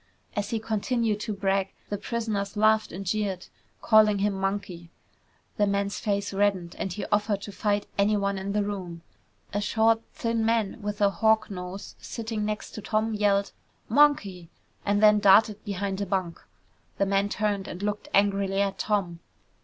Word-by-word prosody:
As 205 -1 -2
he 225 - -1
continued 220 0 -1
to 215 0 -3
brag, 195 0 0 0.2
the 205 - -2
prisoners 215 -4 -3
laughed 215 +1 +3
and 195 +3 -6
jeered, 195 -1 -2 0.4
calling 215 -2 +5
him 200 +1 +1
Monkey. 190 -3 -3 0.7
The 205 -1 +3
man's 200 0 -1
face 200 -1 -1
reddened 195 -3 0
and 190 - -2
he 205 - -4
offered 205 -1 +1
to 205 - -7
fight 205 0 0
anyone 200 -1 +2
in 195 +1 -4
the 210 0 +1
room. 180 -5 -5 0.5
A 205 - 0
short, 225 +1 +2
thin 230 -1 -1
man 225 -1 0
with 205 0 -4
a 200 -1 +4
hawk 220 +1 +2
nose 180 +1 -7
sitting 225 -2 -4
next 210 0 -4
to 215 - -7
Tom 215 +2 0
yelled, 200 -1 +1 0.4
"Monkey," 215 - +3 0.4
and 205 +1 +2
then 210 0 +7
darted 210 +1 +5
behind 200 -1 -3
a 200 - -2
bunk. 185 -3 -2 0.6
The 200 - +2
man 195 +1 +1
turned 205 -2 -1
and 180 +3 -7
looked 210 0 -2
angrily 195 -1 +2
at 200 -1 0
Tom. 190 -5 -1
205 Hz, 165 wpm, -26 LUFS, 195-215 Hz, 0.7 s, then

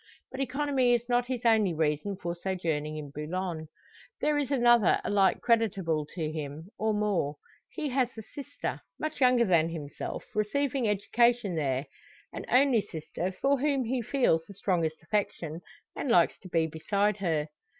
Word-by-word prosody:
But 265 - -7
economy 270 -2 +2
is 240 0 -3
not 245 0 +1
his 250 -2 -4
only 215 -6 +4
reason 155 +5 0
for 170 -2 -3
sojourning 165 -4 -2
in 145 -2 -7
Boulogne. 160 +2 -4 0.5
There 300 0 +1
is 290 -3 0
another 240 -6 +4
alike 200 -2 +2
creditable 195 -10 +1
to 160 -4 -2
him, 155 +3 -6
or 220 0 +1
more. 205 -9 0 0.3
He 300 - -4
has 255 -2 +1
a 220 - -6
sister, 285 +6 -6 0.2
much 310 -2 -4
younger 250 -2 +5
than 165 -4 +3
himself, 150 -4 -6
receiving 250 +3 0
education 230 +1 +2
there; 140 -3 -1 0.5
an - - -6
only 255 -3 +4
sister, 180 -1 -5
for 275 +8 +1
whom 280 -1 +1
he 245 +2 -1
feels 230 -9 +2
the 200 - -11
strongest 170 -5 -1
affection, 175 -6 -2 0.3
and 275 - -3
likes 175 -7 +4
to 185 - -12
be 165 -2 +2
beside 200 +6 0
her. 160 -6 -1
200 Hz, 160 wpm, -29 LUFS, 160-245 Hz, 0.5 s, younger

